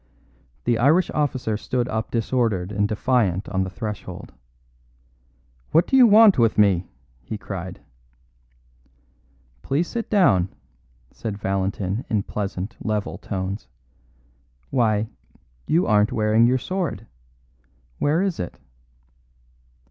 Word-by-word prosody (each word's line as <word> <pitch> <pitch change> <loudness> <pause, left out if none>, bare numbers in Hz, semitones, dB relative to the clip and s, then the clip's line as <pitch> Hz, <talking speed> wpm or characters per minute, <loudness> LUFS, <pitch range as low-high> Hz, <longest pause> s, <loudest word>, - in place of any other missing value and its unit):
The 120 -1 +1
Irish 155 +9 +3
officer 130 -7 -1
stood 125 +2 -2
up 110 -1 -3
disordered 115 -5 0
and 105 0 +1
defiant 105 -4 0
on 95 -1 0
the 95 - -4
threshold. 100 -3 -7 1.4
"What 165 - +5
do - - 0
you 255 -2 +8
want 215 - +7
with 115 -1 +3
me?" 95 -4 +3 0.3
he 105 - -6
cried. 95 -3 -7 1.8
"Please 150 - 0
sit 230 -1 -4
down," 100 - +3 0.6
said 105 -3 -5
Valentin 95 +2 -2
in 105 -3 +1
pleasant, 100 -1 -4
level 105 -2 -2
tones. 95 +1 -4 1.0
"Why, 110 -4 +2 0.6
you 170 +3 +3
aren't 105 0 +3
wearing 110 +1 +3
your 130 +2 +3
sword. 170 - -3 0.9
Where 155 +6 +2
is 195 -4 -2
it?" 90 - -5
110 Hz, 110 wpm, -23 LUFS, 100-130 Hz, 1.8 s, you